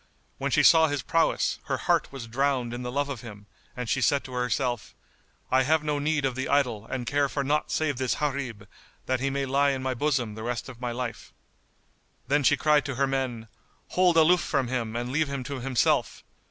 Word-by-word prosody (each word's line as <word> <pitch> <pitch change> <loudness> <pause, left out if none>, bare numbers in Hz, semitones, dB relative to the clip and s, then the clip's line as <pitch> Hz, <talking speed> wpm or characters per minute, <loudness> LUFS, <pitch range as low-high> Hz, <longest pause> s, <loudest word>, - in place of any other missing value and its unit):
When - - -1
she - - +3
saw 160 -1 +7
his 145 -3 -2
prowess, 165 -1 +1
her - - -1
heart - - +1
was 135 -4 -7
drowned 125 0 0
in 120 - -5
the 125 0 -4
love 145 +2 0
of 135 -5 -5
him 105 -3 -11 0.3
and 125 -1 -4
she 130 - 0
said 140 +3 +2
to 130 - -10
herself, 125 -1 -2 0.6
"I 130 +1 +5
have 155 +4 +2
no 150 -1 -1
need 150 -1 0
of 130 - 0
the 130 +1 -3
idol 120 -7 +1
and 125 -2 -4
care 140 +2 +1
for 140 - -2
naught 150 +2 0
save 155 -4 0
this 130 -1 0
Gharib, 140 -6 -3 0.4
that 130 0 0
he 135 +2 0
may 140 0 -1
lie 140 +2 +2
in 135 -1 -2
my 130 0 0
bosom 130 -4 0
the 110 - -8
rest 120 +1 -3
of 125 -1 -12
my 120 -1 -2
life." 120 0 -5 0.9
Then 145 +3 +2
she 130 - +4
cried 150 -2 +3
to 135 -2 -3
her 140 +2 +2
men, 130 -4 -2 0.4
"Hold 180 -2 +3
aloof 170 +2 +5
from 135 -5 -1
him 115 -3 -2
and 120 +1 -3
leave 155 +2 +1
him 140 -2 -4
to 140 +1 -5
himself!" 125 -1 +1
135 Hz, 220 wpm, -27 LUFS, 125-145 Hz, 0.9 s, saw